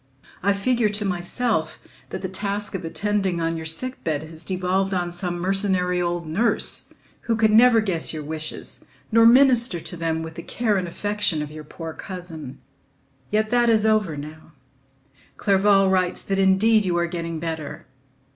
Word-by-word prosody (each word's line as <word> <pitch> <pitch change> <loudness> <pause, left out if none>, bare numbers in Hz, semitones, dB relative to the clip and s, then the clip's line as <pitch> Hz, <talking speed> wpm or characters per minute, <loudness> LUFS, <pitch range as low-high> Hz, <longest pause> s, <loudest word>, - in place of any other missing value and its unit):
I 200 +2 +3
figure 225 +2 +1
to 210 0 -2
myself 180 0 -1 0.3
that - - -6
the - - -1
task 200 +2 -3
of 190 -2 -4
attending 195 +1 -1
on 165 0 -1
your 160 -1 -5
sickbed 160 - -2
has 160 +1 -8
devolved 190 +1 0
on 175 -1 -1
some 175 0 -4
mercenary 185 -1 +1
old 175 -1 -2
nurse, 210 +10 +1 0.3
who 230 - +1
could 220 -1 +3
never 230 +1 +6
guess 185 -6 0
your 155 -2 -5
wishes 155 +1 -5 0.3
nor 230 +1 +6
minister 245 -5 +5
to 175 - -5
them 160 -1 -2
with 160 0 -7
the 170 - -7
care 220 +2 -1
and 180 -1 -2
affection 205 -3 -1
of 150 - -8
your 155 0 -9
poor 160 +2 -8
cousin. 175 -8 -8 0.7
Yet 215 +1 0
that 240 -1 +3
is 220 -1 +3
over 210 -8 +2
now: 155 +2 -10 0.8
Clerval 195 0 +3
writes 185 -1 +1
that 195 0 -1
indeed 205 +3 +4
you 180 -3 0
are 170 - +2
getting 170 -1 -4
better. 160 -2 -5
185 Hz, 165 wpm, -23 LUFS, 165-210 Hz, 0.8 s, never